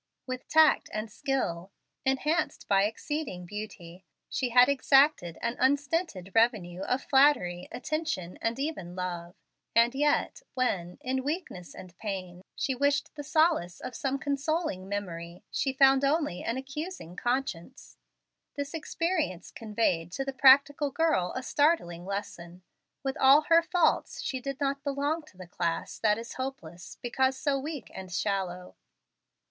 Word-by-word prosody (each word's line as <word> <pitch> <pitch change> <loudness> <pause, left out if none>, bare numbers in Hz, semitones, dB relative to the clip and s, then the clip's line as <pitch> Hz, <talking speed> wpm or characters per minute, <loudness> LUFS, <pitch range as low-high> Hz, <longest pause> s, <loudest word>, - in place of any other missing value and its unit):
With 255 -1 -6
tact 315 -1 +5
and 215 +1 -4
skill, 200 - -2 0.4
enhanced 305 +5 0
by 195 0 +4
exceeding 225 - -4
beauty, 190 -3 -8 0.3
she 255 - -1
had 245 +1 +7
exacted 275 - +3
an 235 +1 0
unstinted 275 - 0
revenue 215 -6 +2
of 250 +6 -1
flattery, 265 -11 +3
attention, 250 - -3
and 230 +1 -1
even 270 - -4
love; 175 -1 -5 0.4
and 235 +1 +5
yet, 295 - +1
when, 180 -9 -1
in 260 +1 -1
weakness 275 - -5
and 180 -1 -11
pain, 185 -4 -5
she 270 - -1
wished 285 +3 +1
the 290 - -7
solace 310 - +2
of 250 - -7
some 270 +2 -1
consoling 285 - -2
memory, 175 -4 -5
she 270 - 0
found 270 0 +5
only 285 - +1
an 230 - -2
accusing 270 - -6
conscience. 245 -2 -3 0.6
This 285 +1 -4
experience 320 - -2
conveyed 210 -7 -1
to 270 - -2
the 275 - -3
practical 280 +2 +6
girl 300 - +1
a 260 - -3
startling 245 - +1
lesson. 180 -3 -6 0.4
With 270 -1 -2
all 270 +3 +7
her 335 0 +7
faults, 350 +1 +1
she 260 - -2
did 275 +1 -5
not 275 0 -1
belong 285 +3 -1
to 185 - -19
the 185 - -9
class 170 -1 -3
that 210 -1 +3
is 230 +1 -7
hopeless, 185 -11 -7
because 260 +2 +1
so 275 0 0
weak 290 -3 -6
and 190 -1 -8
shallow. 180 -2 -2
255 Hz, 140 wpm, -29 LUFS, 185-285 Hz, 0.6 s, had